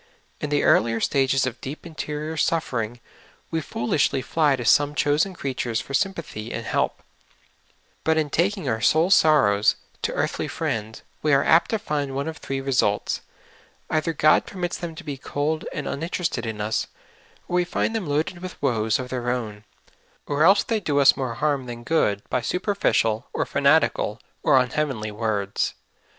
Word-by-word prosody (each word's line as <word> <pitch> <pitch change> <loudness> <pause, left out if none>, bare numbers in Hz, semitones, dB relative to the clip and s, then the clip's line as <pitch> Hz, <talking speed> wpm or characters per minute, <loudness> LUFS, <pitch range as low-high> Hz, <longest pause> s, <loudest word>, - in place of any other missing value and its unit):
In 150 - -3
the 145 0 +1
earlier 115 +1 +3
stages 135 +1 +2
of 130 -2 -5
deep 145 +5 -7
interior 155 -1 -5
suffering 120 -8 -1 0.5
we 165 -1 0
foolishly 135 0 0
fly 150 0 +2
to 125 -2 -5
some 145 +5 +4
chosen 150 +7 +1
creatures 125 -6 -2
for 140 - -8
S3'mpathy 160 - -2
and - - -4
help; - - -1 1.0
but 160 0 +2
in 150 -2 0
taking 195 +4 0
our 110 0 -1
soul 160 - +3
sorrows 135 - +5 0.3
to - - -1
earthly - - -1
friends, 110 0 -3 0.2
we 150 - +1
are 135 0 +4
apt 165 - +4
to 220 - +1
find 145 -9 -3
one 140 +2 -2
of 160 -1 -5
three 135 0 -4
results 130 -6 0 0.3
— - - -31
either 160 +1 +1
God 155 -1 +3
permits 180 -2 -3
them 170 -2 -6
to - - -9
be 145 -3 -5
cold 150 +4 -2
and 145 - -4
uninterested 160 -5 -2
in 110 -2 -4
us, 110 +1 -1 0.6
or 180 - 0
we 180 - +3
find 180 +5 -1
them 210 -7 -2
loaded 155 +5 -1
with 185 0 -8
woes 110 -5 +1
of 125 -1 -6
their 125 -1 -2
own, 110 -4 -3 0.6
or 145 +1 +1
else 195 +5 +6
the}^ 220 -2 -1
do 145 -1 +1
us 140 -1 +6
more 130 -4 -3
harm 140 -2 0
than 120 -1 -7
good 105 -9 +1
by 125 - 0
superficial, 120 - 0
or - - 0
fanatical, 140 -6 +2 0.2
or - - +4
unheav 135 +4 +1
enly 110 -3 -5
words. 105 -2 -1
140 Hz, 175 wpm, -24 LUFS, 120-160 Hz, 1.0 s, else